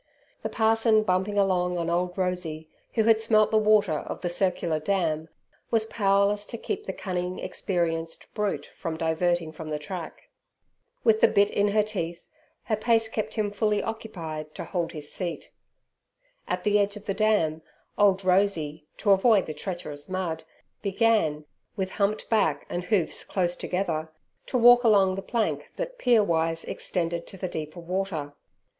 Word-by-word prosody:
The - - -3
parson 225 -1 +3
bumping 190 +1 0
along 180 -2 +2
on 170 -1 -2
old 180 +2 -1
Rosey, 180 -4 -2 0.3
who 220 - +3
had 225 0 +4
smelt 215 -1 +3
the 220 - +4
water 210 -7 +3
of - - -7
the 175 - -1
"Circler 175 -3 0
Dam", 165 -4 0 0.4
was 225 -1 +2
powerless 200 -1 +2
to 235 - -5
keep 420 - -4
the - - -1
cunning 180 -1 -3
experienced 165 -3 -2
brute 210 -2 -1
from 165 -3 -4
diverting 165 0 0
from 155 0 -8
the 150 - -1
track. 165 +3 -8 0.7
With 220 -2 +4
the - - +8
bit 200 -1 +3
in 205 0 +2
her 210 +1 +3
teeth, 175 -5 -4 0.4
her 220 - 0
pace 225 +1 +2
kept 215 -1 -3
him 210 -2 0
fully 210 0 +1
occupied 165 -9 -6
to - - -5
hold 170 -3 -2
his 150 -3 -6
seat. 175 -3 -4 1.0
At - - -2
the 210 0 +3
edge 205 +1 0
of 210 - -12
the 195 - -1
Dam, 190 -7 +2 0.3
old 195 -2 +3
Rosey, 165 -6 +1
to 205 - +2
avoid 195 0 +5
the 155 - -5
treacherous 150 -2 -6
mud, 175 -4 -2 0.4
began, 200 -8 +1 0.3
with 190 -2 -2
humped 205 +1 0
back 205 -10 +1
and 175 +1 -3
hoofs 185 -6 0
close 180 -2 -1
together, 165 -5 -2 0.4
to 255 - 0
walk 245 +1 +7
along 200 -4 +5
the 195 - -4
plank 230 +3 -1
that - - -5
pier 235 -4 +4
wise 165 -2 0
extended 170 -1 -2
to 195 - -11
the 185 - -3
deeper 160 0 -6
water. 170 -5 -3
190 Hz, 165 wpm, -26 LUFS, 165-215 Hz, 1.0 s, the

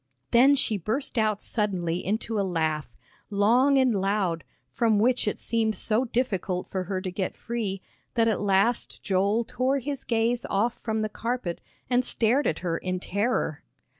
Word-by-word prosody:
Then 265 +4 +6
she 225 -7 0
burst 230 - -1
out 215 -2 +1
suddenly 180 -6 -1
into 220 +2 -1
a - - +3
laugh, 160 -7 -1 0.3
long 240 +7 +4
and 260 -3 +4
loud, 195 -4 0 0.3
from 220 - +2
which 240 +2 +2
it 210 - -1
seemed 220 -2 0
so 225 +4 0
difficult 200 -7 -1
for 185 -1 -2
her 185 0 -2
to 185 -1 -4
get 185 0 -3
free, 210 -5 -3 0.3
that 230 -1 +3
at 220 - +1
last 205 +4 +1
Joel 200 +4 +2
tore 255 +4 0
his 275 0 -4
gaze 235 +1 0
off 220 +5 +1
from 220 -1 -2
the - - 0
carpet 230 -4 -3 0.3
and 250 0 +2
stared 245 +4 +2
at - - 0
her 170 -1 0
in 185 0 -2
terror. 200 -5 -1
215 Hz, 165 wpm, -26 LUFS, 190-240 Hz, 0.3 s, Then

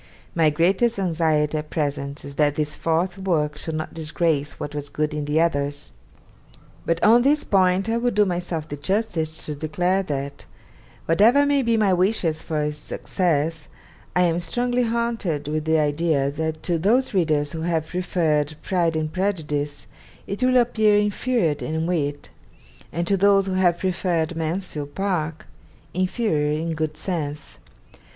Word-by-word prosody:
My 160 -2 +4
greatest 190 +10 +2
anxiety 160 -4 +1
at 150 0 -8
present 140 -2 -3
is 140 - -8
that 145 0 +2
this 150 0 -1
fourth 175 +3 -1
work 155 -6 0
should 155 +1 -4
not 155 0 -4
disgrace 155 -2 -1
what 145 - -5
was 145 -1 -5
good 150 +1 -2
in 150 -1 -3
the 150 +2 +1
others. 145 -3 -1 1.0
But 165 0 0
on 230 +3 +7
this 290 +4 +3
point 190 0 +2
I 225 +1 +1
will 245 +1 +1
do 210 -2 +3
myself 175 -4 -3
the 145 - -6
justice 160 -2 -2
to 150 - -3
declare 175 +6 0
that, 140 -5 -5 0.6
whatever 225 +12 +5
may 285 -1 +3
be 230 -2 +2
my 205 -3 +3
wishes 180 -4 +1
for 155 -2 -2
its 150 0 -2
success, 160 -1 -1 0.5
I 180 - +4
am 170 -1 +2
strongly 245 +8 0
haunted 225 -10 -1
with 155 0 -2
the 160 0 +3
idea 150 -2 +1
that 155 +1 -3
to 170 -2 0
those 235 +9 +2
readers 155 -6 +1
who 160 - -5
have 165 -2 0
preferred 160 -4 0
"Pride 170 -3 +1
and 155 0 -2
Prejudice" 150 -7 -2 0.4
it 200 +4 -5
will 255 0 +4
appear 220 -4 +3
inferior 210 -2 +1
in 160 +1 -2
wit, 145 -5 -2 0.6
and 170 +2 -2
to 195 +2 +2
those 195 0 +4
who 190 - -2
have 180 -2 +3
preferred 175 -3 -1
"Mansfield 160 -3 -4
Park" 170 -5 -2 0.5
inferior 170 -6 0
in 165 +1 -2
good 155 -1 -3
sense. 150 -5 -4
165 Hz, 160 wpm, -23 LUFS, 150-190 Hz, 1.0 s, on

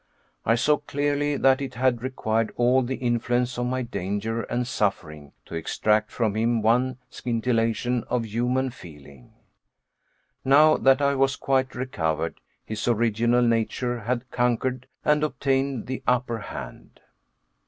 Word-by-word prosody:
I 115 - +5
saw 150 +5 +3
clearly 145 0 -1
that 135 +1 +3
it 130 -2 -5
had 125 -1 +1
required 115 -3 -1
all 125 +2 +3
the 130 +1 -2
influence 120 0 0
of 125 - 0
my 130 +1 -1
danger 110 +1 -3
and 125 +2 -2
suffering, 80 - -2
to - - -12
extract 105 +6 0
from 110 -4 0
him 115 0 +1
one 125 +3 +2
scintillation 115 0 0
of 125 -2 -1
humane 125 +4 0
feeling. 70 - -14 1.1
Now 150 +3 +6
that 135 +1 +4
I 140 0 +3
was 135 0 +2
quite 130 -1 0
recovered, 80 -11 -2 0.2
his 110 +1 -4
original 120 +1 +2
nature 120 +1 0
had 120 +3 -3
conquered 125 +1 0 0.2
and 150 0 +3
obtained 135 -4 0
the 130 0 -4
upper 125 -2 +1
hand. - - -9
120 Hz, 135 wpm, -25 LUFS, 115-130 Hz, 1.1 s, Now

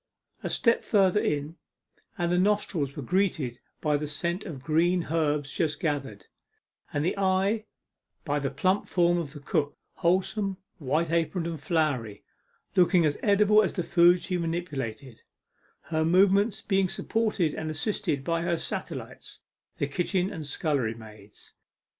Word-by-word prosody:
A - - -3
step 230 -1 +2
further 195 -1 +3
in, 150 -1 -2 0.6
and 175 -1 0
the 180 - +3
nostrils 185 -8 0
were 145 - -5
greeted 155 -7 0 0.2
by 150 -1 +2
the 150 +1 -4
scent 170 +6 -3
of 145 -9 -7
green 170 +3 +2
herbs 150 -3 0
just 155 -3 -1
gathered, 140 - -3 0.7
and 145 +1 -1
the 180 - 0
eye 195 +3 +1 0.6
by 145 -1 0
the 135 -1 -1
plump 185 +9 0
form 175 -1 +2
of 150 -4 -5
the 145 - -9
cook, 145 0 -1 0.2
wholesome, 190 +2 0 0.2
white 155 +3 0
aproned, 165 +1 0
and 165 -3 -4
floury 145 - -1 0.5
looking 180 -2 +4
as 145 -1 0
edible 210 +1 +5
as 200 - 0
the 180 - -1
food 175 +1 +4
she 180 -2 -2
manipulated 140 -8 -4 0.6
her 160 0 -1
movements 195 +5 +3
being 195 -2 +1
supported 215 -9 0
and 160 0 -4
assisted 155 -3 -2
by 165 +2 0
her 170 0 0
satellites, - - -6 0.4
the - - 0
kitchen 180 +5 -1
and 155 -3 -6
scullery 140 -7 -1
maids. 105 -2 -14
165 Hz, 145 wpm, -27 LUFS, 145-185 Hz, 0.7 s, edible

